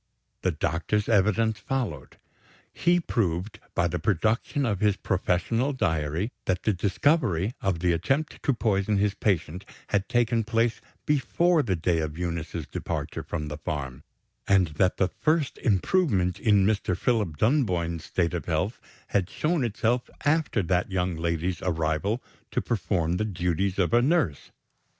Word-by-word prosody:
The - - +1
doctor's 105 +6 -1
evidence 110 +1 +2
followed. 110 - -3 0.6
He 175 +1 +3
proved, 100 - -1 0.2
by 85 -1 +2
the 85 +1 -2
production 110 - 0
of 105 -5 0
his 105 -2 +3
professional 105 +9 0
diary, 80 - -1
that 90 -1 0
the 110 - +2
discovery 100 - +1
of 95 -7 -1
the 90 -1 +3
attempt 135 - -1
to - - +2
poison 105 -2 +1
his 100 0 +2
patient 95 -3 -1 0.3
had 100 -1 0
taken 120 -2 +2
place 115 +1 0 0.2
before 150 +5 +2
the 100 -9 0
day 85 0 +1
of 80 -1 -3
Eunice's 85 -2 -3
departure - - -4
from 75 -3 -4
the 75 0 -6
farm, 70 -5 -4 0.5
and 95 -4 +4
that 90 +5 +1
the 95 - +2
first 155 -3 +1
improvement 100 - +1
in 105 -4 +4
Mr. 100 -3 +1
Philip 105 -9 0
Dunboyne's 90 - +1
state 85 -1 0
of 85 - -4
health 90 +7 -1 0.3
had 95 -2 +1
shown 155 -2 0
itself 120 +2 0 0.2
after 145 -8 +2
that 90 +1 0
young 90 -2 0
lady's 85 +1 -2
arrival 80 +6 -1 0.3
to - - -1
perform 90 -6 0
the 110 - 0
duties 90 -1 -1
of 95 +2 +1
a 120 - +6
nurse. 140 - +1
95 Hz, 150 wpm, -26 LUFS, 85-115 Hz, 0.6 s, a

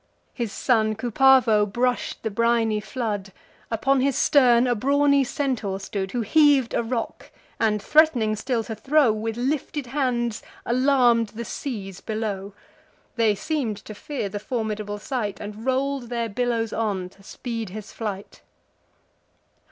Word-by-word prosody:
His 235 -5 -3
son 220 -3 +1
Cupavo 240 -1 +4
brush'd 245 +4 -1
the 220 - -2
briny 230 0 +2
flood: 210 -2 -4 0.4
Upon 260 +4 +1
his 275 -1 +1
stern 250 -4 +5
a 245 - +2
brawny 280 +4 +3
Centaur 245 -8 -2
stood, 195 -1 -4
Who 240 -2 -1
heav'd 290 -1 +4
a - - +1
rock, 230 0 -4 0.3
and, 215 -2 +2
threat'ning 245 -3 +3
still 230 +1 -1
to 220 - -6
throw, 270 +3 +3
With 220 +1 -3
lifted 275 +2 -2
hands 240 -4 -1 0.2
alarm'd 245 -2 +3
the 235 +2 -7
seas 195 -8 -6
below: 205 -3 -4 0.6
They 225 -3 +3
seem'd 250 -2 -2
to 215 - -7
fear 240 +1 -4
the 205 +1 -5
formidable 215 -2 -3
sight, 210 -2 -3
And 210 +3 -7
roll'd 265 -1 0
their 235 -2 -2
billows 230 0 -1
on, 200 -5 -2
to 195 - -22
speed 230 +1 -5
his 210 +2 -9
flight. 205 -3 -6
230 Hz, 140 wpm, -24 LUFS, 210-255 Hz, 0.6 s, stern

